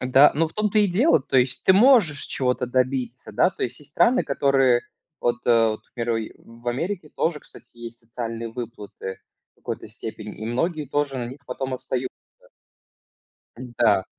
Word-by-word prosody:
Да, 130 +3 +6
ну, 165 +2 +2
в - - -12
том-то 215 0 +1
и 210 - +5
дело, 195 - +4
то 135 - +2
есть 130 +1 0
ты 190 - +7
можешь 200 - +5
чего-то 125 -1 -1
добиться, 130 0 -1
да, - - +4
то - - -7
есть 125 +1 -3
есть 150 -1 -18
страны, 255 +2 +3
которые 135 -3 +3 0.4
вот, 120 0 +1
э 115 -2 +5
вот, 110 - -5
к - - -45
примеру, 115 -2 -2
в 115 +1 -9
Америке 165 +6 -3
тоже, 160 -1 -1
кстати, - - -17
есть 115 0 -9
социальные 115 0 -5
выплаты 115 -5 -7 0.3
в - - -
какой-то - - -6
степени, 110 -1 -8
и 110 - -7
многие 150 +7 -1
тоже 140 0 -1
на 125 - -2
них 135 - -10
потом 130 +1 -4
остаются. 130 0 -3 1.4
Да, 120 -6 +1
125 Hz, 175 wpm, -24 LUFS, 115-150 Hz, 1.4 s, ты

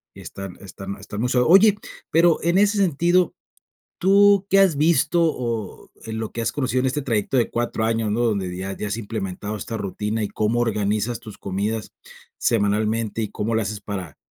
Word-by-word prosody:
y - - -11
están 95 -2 -8
están 100 0 -8
están 105 +1 -8
muy 125 - 0
so 125 +1 +2
oye, 195 +4 +7 0.3
pero 165 0 +4
en 170 +3 +2
ese 205 +1 +3
sentido, 175 0 +2 0.6
¿tú 200 +1 +5
qué 195 0 +5
has 185 -6 +4
visto?, 165 +2 +3
o 115 - -3 0.2
en 110 0 -4
lo 110 -1 -4
que 115 - -4
has 115 - -1
conocido 130 -3 0
en 130 - 0
este 140 +3 -1
trayecto 115 -1 -1
de 120 - +2
4 120 -1 -1
años, 115 -1 0
¿no?, 115 +3 0
donde 100 -6 0
ya 95 +1 -4
ya 105 - -5
has 105 +2 -2
implementado 105 -1 -4
esta 115 +3 -5
rutina 105 +2 -3
y 105 - -1
cómo 110 +4 0
organizas 105 0 0
tus 110 -3 -11
comidas 105 +3 -3 0.5
semanalmente 110 +1 0
y 110 - -1
cómo 110 +2 -2
lo 110 - +2
haces 105 -1 -4
para, 95 -8 -6
115 Hz, 195 wpm, -22 LUFS, 105-145 Hz, 0.6 s, oye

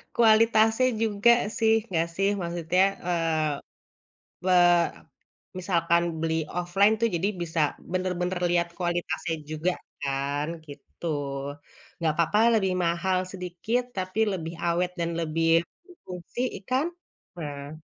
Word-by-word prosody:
kualitasnya 225 +1 +5 0.2
juga, 215 +2 +4 0.3
sih, 225 -1 +4
enggak, 170 -3 0
sih, 195 +1 +3
maksudnya, 175 +1 +1 0.2
eee, 165 -3 +1 1.0
pe 185 - +2 1.1
Misalkan 170 -2 +2 0.2
beli 160 -1 0
offline, 180 +6 +2
tuh, 230 - +3
jadi 180 +4 0
bisa 165 -1 -2 0.3
benar-benar 180 0 -1
lihat 170 0 +2
kualitasnya 175 -2 -2
juga, 155 +4 0 0.3
kan, 140 +2 -1 0.2
gitu. 145 +3 -12 0.9
Enggak 160 -2 0
apa-apa 170 +5 +2 0.2
lebih 190 -3 +1
mahal 175 +2 +1
sedikit, 180 +6 -2 0.2
tapi 185 +2 -3
lebih 165 -3 -4
awet 175 +1 +1
dan 170 0 0
lebih 165 +1 0 0.4
berfungsi, 185 - -8 0.2
iya, - - -12
kan? 265 +5 +2 0.5
Nah. 145 -2 -6
175 Hz, 115 wpm, -26 LUFS, 165-195 Hz, 1.1 s, kualitasnya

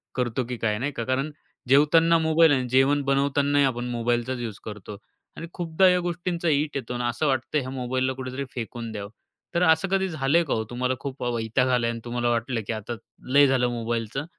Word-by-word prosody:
करतो 125 0 -1
की 125 - -3
काय 105 -2 0
नाही 140 +4 -2
का. 120 - -4
कारण 130 +5 -1 0.4
जेवताना 165 +4 +5
मोबाईल 160 0 +4
आहे 140 - +3
आणि 125 -1 -4
जेवण 135 +3 +3
बनवतानाही 140 +1 +2
आपण 120 -2 -1
मोबाईलचाच 120 +1 -1
युज 115 -4 -5
करतो. 105 -1 -8 0.4
आणि 165 - -6
खूपदा 175 +1 +2
या 180 0 +3
गोष्टींचा 175 -1 -2
इट 150 0 0
येतो 130 -2 -5
आणि 120 0 -3
असं 120 +6 -1
वाटतं 130 +2 0
ह्या 130 -2 -5
मोबाईलला 130 0 -1
कुठेतरी 130 +1 -5
फेकून 115 -1 -5
द्यावं. 100 -2 -6 0.5
तर 170 - +3
असं 160 +2 +4
कधी 190 0 +1
झालंय 155 +1 +2
का 150 - -2
हो 110 - 0
तुम्हाला 125 +1 -1
खूप 135 -1 -6
वैताग 120 +1 0
आला 125 -2 +2
आहे - - 0
आणि 115 0 -6
तुम्हाला 120 0 -1
वाटलं, 115 0 -1
की - - -1
आता 110 +2 -5 0.4
लय 145 0 +7
झालं 130 -2 +2
मोबाईलचं. 120 +3 -3
130 Hz, 205 wpm, -25 LUFS, 120-145 Hz, 0.5 s, लय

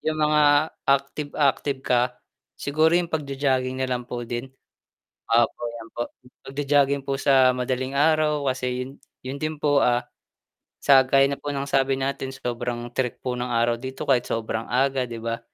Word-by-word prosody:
'yung 155 0 -1
mga 150 0 +3 0.2
active 140 +1 0
active 140 -1 +1
ka, 125 0 +1 0.4
siguro 155 +3 +2
yung 175 -1 0
pag-jo-jogging 135 -3 -1
na 130 - 0
lang 125 -1 -2
po 120 -1 -4
din. 120 +3 -5 0.8
Opo 115 0 +2
'yan 115 -1 -9
po 120 - -1 0.4
pag-jo-jogging 140 0 +1
po 135 0 -1
sa 130 -2 +5
madaling 130 +1 -2
araw 150 -1 +2
kasi 125 -1 -3
yun - - -9 0.3
yun 130 +2 -5
din 155 0 -3
po 145 -2 +3
ah 120 0 +2 0.8
sa 135 -2 +6
gaya 135 +1 +4
na 140 - -4
po 145 - -3
ng 140 0 -3
sabi 135 -1 +2
natin 135 0 -2
sobrang 120 -1 -4
tirik 125 -2 -1
po 125 -1 -2
ng 125 0 -3
araw 115 0 +2
dito 130 +1 -6
kahit 125 -3 +3
sobrang 115 0 -3
aga, 135 +1 +2
'di 115 -1 -7
ba. 115 0 -2
135 Hz, 170 wpm, -24 LUFS, 125-140 Hz, 0.8 s, sa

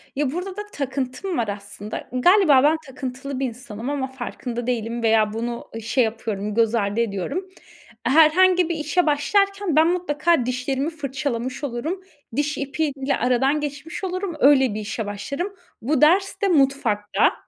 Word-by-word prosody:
Ya, 275 -1 0
burada 365 +4 -5
da 415 - -2
takıntım 275 +6 -3
var 230 - 0
aslında. 205 +1 -6
Galiba 290 +1 +5
ben 305 +2 +4
takıntılı 265 0 -6
bir 270 - 0
insanım 240 -1 -6
ama 280 -2 -1
farkında 245 -2 -5
değilim 235 -1 -2
veya 220 -2 +3
bunu 235 +1 -4
şey 245 +4 +2
yapıyorum, 215 -2 -3
göz 230 +1 +2
ardı 205 0 0
ediyorum. 235 - -2 0.6
Herhangi 340 +5 +5
bir 340 - 0
işe 310 +3 +1
başlarken 395 +4 +1
ben 315 +1 +6
mutlaka 335 -5 +1
dişlerimi 260 +3 -1
fırçalamış 275 -4 -4
olurum. 290 +9 -3 0.3
Diş 295 +1 0
ipiyle 280 -1 -1
aradan 255 +4 +2
geçmiş 295 +4 -6
olurum. 370 -2 -3
Öyle 265 -4 +5
bir 215 - -3
işe 220 +1 -4
başlarım. 280 - -4 0.3
Bu 275 +4 0
ders 380 +8 +3
de 400 - +3
mutfakta. 270 - +2
270 Hz, 150 wpm, -23 LUFS, 235-315 Hz, 0.6 s, ben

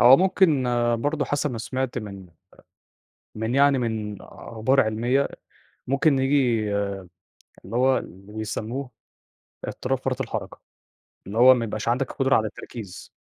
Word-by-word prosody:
هو 130 +2 +9
ممكن 185 -7 +3 0.3
برضه 145 +5 -1
حسب 145 0 -1
ما 120 - -5
سمعت 130 +2 -3
من 100 -4 -8
أ - - -27 1.0
من 110 +2 -2
يعني 140 -1 +5
من 110 -3 -2
أخبار 115 +5 0
علميّة، 120 +4 +1 0.6
ممكن 140 +2 +3
نيجي 130 -4 +2 1.1
اللي 100 +5 -6
هو 130 +2 +4
اللي 100 +3 -9
بيسمّوه، 110 +4 -4 0.8
اضطراب - - -2
فرط - - -2
الحركة، - - -5 0.7
اللي 105 - -5
هو 130 +2 +9
ما 120 -2 -1
يبقاش 110 0 -5
عندك 125 +2 0
القدرة 135 +1 +2
على 110 - +2
التركيز، 105 -2 -9
125 Hz, 135 wpm, -24 LUFS, 110-135 Hz, 1.1 s, هو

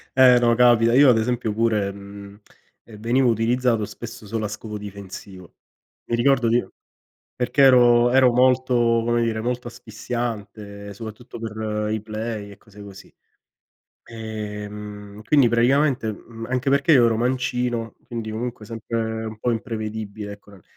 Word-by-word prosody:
Eh 125 -2 +7
no, 120 -1 +3
capita, 120 -1 +4
io 135 +1 +7
ad 115 - +5
esempio 115 -1 -1
pure, 110 -3 +1
mhmm, 100 +1 -11 0.4
ehm, 105 -3 -14
venivo 120 +3 +2
utilizzato 115 0 +1
spesso 115 0 -10
solo 110 0 -3
a - - -1
scopo 105 0 -7
difensivo. 100 -3 -10 0.5
Mi 120 - 0
ricordo 125 0 +2
nio 120 +2 0 0.6
perché 125 +3 +1
ero 120 -2 +6
ero 130 -1 +5
molto, 130 +1 +3 0.3
come 120 0 +1
dire, 110 -1 -1
molto 125 +1 -3
asfissiante 110 -3 -6
soprattutto 115 +3 -9
per 110 -1 -3
i 110 -1 -2
play 110 -1 -5
e 100 - -14
cose 105 0 -15
così. 100 -1 -13 0.9
Ehm, 105 -2 -8
quindi 135 0 +4
praticamente, 125 0 +2
mhmm, 115 +2 -10
anche 130 +1 0
perché 140 +4 +3
io 125 -3 +6
ero 115 -1 +2
mancino, 125 -2 -1
quindi 115 -2 -5
comunque 115 -1 -5
sempre 110 0 -4
un 110 -1 -7
po' 120 +2 0
imprevedibile 110 -2 -5
ecco 100 0 -17
nel 95 -3 -17
115 Hz, 145 wpm, -22 LUFS, 105-120 Hz, 0.9 s, Eh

